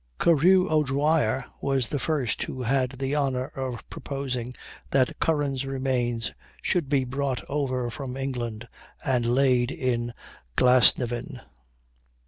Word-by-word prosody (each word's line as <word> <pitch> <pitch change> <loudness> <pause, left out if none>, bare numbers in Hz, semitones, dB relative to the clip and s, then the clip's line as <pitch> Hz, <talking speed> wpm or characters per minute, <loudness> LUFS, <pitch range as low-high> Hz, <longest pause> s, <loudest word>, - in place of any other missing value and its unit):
Carew 180 +4 +5
O'Dwyer 145 -4 +2 0.2
was 135 -4 0
the 145 - -1
first 140 -4 -1
who 130 - -4
had 130 +1 +1
the 135 +1 -2
honor 135 -3 0
of 130 -3 -5
proposing 125 -3 -4 0.3
that 130 -2 +1
Curran's 145 -4 +1
remains 130 -4 -1 0.3
should 165 -6 0
be 135 -2 +3
brought 130 0 -2
over 130 -4 -1
from 130 +1 -6
England 120 -4 -4 0.4
and 125 -3 +1
laid 125 -1 +3
in 125 -7 -1 0.5
Glasnevin. 125 0 +3
130 Hz, 115 wpm, -26 LUFS, 125-140 Hz, 0.5 s, Carew